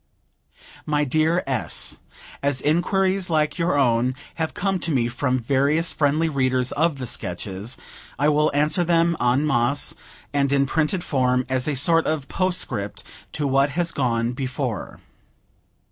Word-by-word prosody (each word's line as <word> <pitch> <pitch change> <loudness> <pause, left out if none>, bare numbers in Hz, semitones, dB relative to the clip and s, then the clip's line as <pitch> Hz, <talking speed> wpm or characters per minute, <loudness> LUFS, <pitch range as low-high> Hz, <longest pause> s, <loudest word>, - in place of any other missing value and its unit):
My 150 -1 +1
Dear 155 +5 +1
S.: 130 -4 -2 0.4
As 140 -1 +1
inquiries 185 +5 +1
like 155 +1 0
your 170 -3 +1
own 125 -1 +2 0.3
have 160 - -2
come 195 -1 0
to 170 - -4
me 125 -6 +1
from 130 +2 -1
various 140 +7 +1
friendly 155 +2 +1
readers 130 -4 +1
of 155 0 +1
the 130 - -5
Sketches, 100 +2 -4 0.4
I 145 - +2
will 150 0 +3
answer 150 +4 +2
them 170 0 +2
en 125 +4 +2
masse 135 0 +1 0.4
and 140 -1 +1
in 140 -1 +3
printed 160 +5 0
form, 125 -2 +1
as 130 +1 -1
a 150 - 0
sort 165 +4 +3
of 150 -3 -2
postscript 140 - -2 0.3
to 150 - -2
what 135 +1 +3
has 170 -1 +1
gone 120 -3 0
before. 130 -2 -4
140 Hz, 145 wpm, -23 LUFS, 130-160 Hz, 0.4 s, will